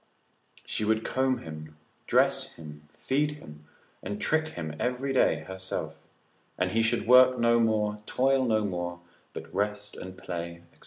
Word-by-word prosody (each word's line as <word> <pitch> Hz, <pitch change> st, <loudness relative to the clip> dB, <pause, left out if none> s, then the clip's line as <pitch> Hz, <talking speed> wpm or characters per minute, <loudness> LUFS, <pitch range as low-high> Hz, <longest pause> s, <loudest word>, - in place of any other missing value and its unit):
She -, -, -2 dB
would 110 Hz, +1 st, +1 dB
comb 130 Hz, 0 st, +1 dB
him, 80 Hz, -1 st, -9 dB, 0.3 s
dress -, -, +3 dB
him, 75 Hz, -1 st, -12 dB
feed 145 Hz, +3 st, 0 dB
him, 75 Hz, -, -13 dB, 0.4 s
and 105 Hz, 0 st, -5 dB
trick 160 Hz, 0 st, +1 dB
him 80 Hz, -2 st, -5 dB
every 125 Hz, +2 st, -1 dB
day 80 Hz, -11 st, +3 dB
herself, 95 Hz, -3 st, -5 dB, 0.6 s
and 90 Hz, 0 st, 0 dB
he 115 Hz, +2 st, +2 dB
should 115 Hz, 0 st, +1 dB
work 125 Hz, +1 st, +7 dB
no 120 Hz, 0 st, +4 dB
more, 105 Hz, -2 st, +1 dB
toil 135 Hz, +1 st, +2 dB
no 110 Hz, -3 st, +2 dB
more, 90 Hz, -2 st, -4 dB, 0.3 s
but 80 Hz, +1 st, -9 dB
rest 105 Hz, +1 st, -2 dB
and 95 Hz, 0 st, -9 dB
play, 85 Hz, -1 st, -6 dB
&c. -, -, -28 dB
105 Hz, 155 wpm, -28 LUFS, 85-125 Hz, 0.6 s, work